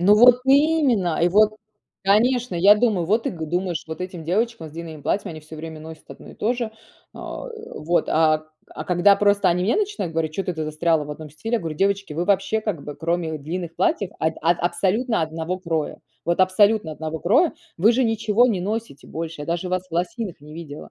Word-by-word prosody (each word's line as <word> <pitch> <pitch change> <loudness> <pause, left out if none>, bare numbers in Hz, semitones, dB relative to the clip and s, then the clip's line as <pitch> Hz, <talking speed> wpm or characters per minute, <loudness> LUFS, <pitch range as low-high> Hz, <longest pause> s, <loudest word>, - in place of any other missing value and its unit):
Ну 200 +4 +6
вот 245 +3 +7
именно! 270 - +3
И 175 - +4
вот, 215 +3 +4 0.5
конечно, 235 +2 +2
я 200 +5 +6
думаю 210 -6 +1
вот 215 +6 +1
и - - +1
к 160 -3 -5
думаешь: 175 -1 -1
"Вот 160 +1 -6
этим 180 -2 -6
девочкам 215 0 -1
с - - -14
длинным 160 -2 -8
платьями, 200 - -1
они 155 - -9
всё 155 +1 -11
время 160 0 -8
носят 160 0 -11
одно - - -12
и - - -13
тоже". 235 0 -1 0.4
А - - -7 0.3
вот, 170 +3 0
а 155 -1 +3 0.3
а 155 - -7
когда 185 +3 +4
просто 200 -2 +3
они 180 +1 +1
мне 215 - +2
начинают 410 - -2
говорить: 160 -1 -1
"Чё-то 180 0 -3
ты 160 - -3
застряла 155 0 +1
в 150 - -8
одном 150 0 -8
стиле". 225 - -4
Я - - +3
говорю: 165 -4 -5
"Девочки, 195 -2 0
вы 170 +3 -2
вообще 205 +2 +1
как 200 -10 -4
бы 145 - -6
кроме 165 0 -2
длинных 165 +3 -5
платьев, 190 +1 0
ад 160 0 +1
ад 170 +1 +2
абсолютно 190 +7 0
одного 160 +3 -3
кроя, 165 -4 -3 0.3
вот 170 0 0
абсолютно 190 -1 +3
одного 160 +1 -5
кроя, 280 - +3 0.2
вы 200 +7 +5
же 250 +2 +2
ничего 225 +1 +2
не 200 -7 0
носите 215 -6 -4
больше. 165 -1 -6
Я 145 - -6
даже 170 +2 -2
вас 185 0 -2
в 165 - -26
лосиных 185 - -3
не 150 +1 -12
видела". 155 -3 -9
180 Hz, 210 wpm, -23 LUFS, 160-215 Hz, 0.5 s, вот